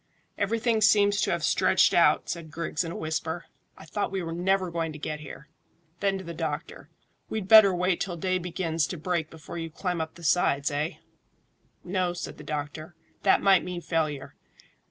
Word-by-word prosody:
"Everything 225 +2 0
seems 205 -1 +4
to - - +1
have - - -1
stretched - - +3
out," - - +4
said 170 -2 -5
Griggs, 160 +1 -2
in 165 - -5
a - - -6
whisper. 160 +1 -3 0.3
"I - - -12
thought 205 +6 -2
we 190 -2 -2
were 165 - -4
never 185 +1 +1
going 165 -1 -2
to - - -8
get 150 0 -4
here." 150 0 -10 0.5
Then 195 -1 +1
to 190 - -7
the 170 -1 -7
doctor, 165 - -5 0.4
"We'd 215 -4 -3
better 215 -2 +9
wait 180 0 0
till 175 -3 -3
day 185 +2 0
begins 165 -3 -1
to 180 - -5
break 160 -1 -2
before 160 +1 -8
you 165 0 -4
climb 175 +1 -3
up 160 0 -5
the 170 - -13
sides, 145 -4 +2
eh?" 150 +4 -1 0.9
"No," 180 -1 -1
said 175 - -7
the - - -9
doctor; 155 +2 -5 0.3
"that 195 - +3
might 195 -2 +5
mean 180 -1 -5
failure. 155 -5 -2
170 Hz, 190 wpm, -27 LUFS, 160-190 Hz, 0.9 s, better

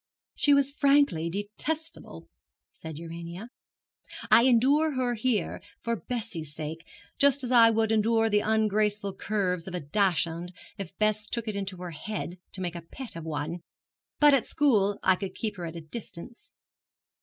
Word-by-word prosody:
'She 290 - +3
was 280 0 +3
frankly 280 - +3
detestable,' 215 - -5 0.4
said 160 -2 -9
Urania. 170 +6 -8 0.8
'I 235 - +7
endure 275 +6 +4
her 250 -1 0
here 225 -4 -1 0.2
for 235 0 0
Bessie's 205 - -5
sake; 160 +1 -6 0.3
just 280 -1 +4
as 250 - -3
I 230 -2 +8
would 225 0 +1
endure 225 +1 +3
the 210 -1 +3
ungraceful 210 -2 +1
curves 190 -4 -1
of 185 - -5
a - - -1
Dachshund 175 +1 0 0.2
if 195 -3 -8
Bess 215 0 +1
took 235 0 -3
it 215 - -2
into 195 -2 -4
her 180 -1 -6
head 180 +2 -5
to 190 - -6
make 175 -2 -2
a 170 - -6
pet 235 +8 -10
of 165 -1 -7
one; 160 +2 -4 0.6
but 295 -1 +7
at 265 -5 +2
school 210 -10 +2
I 190 - +5
could 190 0 -6
keep 215 -2 -3
her 175 - -5
at 165 - -8
a 165 - -6
distance.' 195 +5 -9
210 Hz, 165 wpm, -28 LUFS, 175-235 Hz, 0.8 s, I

